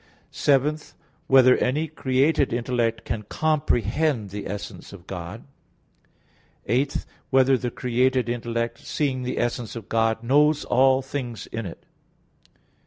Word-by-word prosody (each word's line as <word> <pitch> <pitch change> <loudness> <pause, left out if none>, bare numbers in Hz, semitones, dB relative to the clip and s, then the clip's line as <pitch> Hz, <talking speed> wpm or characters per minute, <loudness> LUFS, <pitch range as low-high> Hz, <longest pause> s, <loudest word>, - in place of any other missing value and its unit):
(7) 145 +2 +2 0.5
Whether 130 -1 +7
any 150 +6 0
created 140 0 +1
intellect 120 -2 -1
can 110 0 -3
comprehend 140 -3 0
the 105 0 -5
essence 105 0 -7
of 90 -3 -12
God? 90 +3 -7 1.2
(8) 130 +6 0 0.2
Whether 135 0 +4
the 125 -1 -2
created 125 +1 +1
intellect 115 0 -2
seeing 135 -4 -2
the 125 0 -3
essence 120 -2 -2
of 115 -2 -8
God, 115 0 +1
knows 150 +4 +3
all 130 +1 +3
things 125 -5 -5
in 115 -3 -5
it? 85 - -11
125 Hz, 120 wpm, -24 LUFS, 115-135 Hz, 1.2 s, Whether